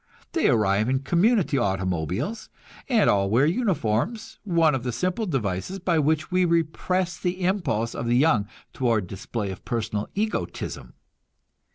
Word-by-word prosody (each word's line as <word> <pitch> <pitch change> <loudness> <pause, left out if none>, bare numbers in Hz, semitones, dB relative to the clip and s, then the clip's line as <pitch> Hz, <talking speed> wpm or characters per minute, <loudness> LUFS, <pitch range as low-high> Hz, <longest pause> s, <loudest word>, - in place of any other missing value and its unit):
They - - +2
arrive 105 -1 +2
in 130 0 +1
community 175 - +2
automobiles, 95 - -2 0.4
and 230 -5 +4
all 100 -1 +3
wear 120 +7 +4
uniforms 185 - -1
one 165 -6 +3
of 135 - -1
the 125 0 -2
simple 185 - -1
devices 120 - -2
by 175 -3 +1
which 155 +2 0
we 185 0 +3
repress 170 +2 0
the 180 0 -2
impulse 115 - 0
of 115 - -4
the 120 +1 +3
young 130 -8 +3 0.3
toward 115 -6 +1
display 100 +2 -4
of 95 - -9
personal 105 -3 -2
egotism. 215 +2 -3
140 Hz, 145 wpm, -25 LUFS, -, 0.4 s, and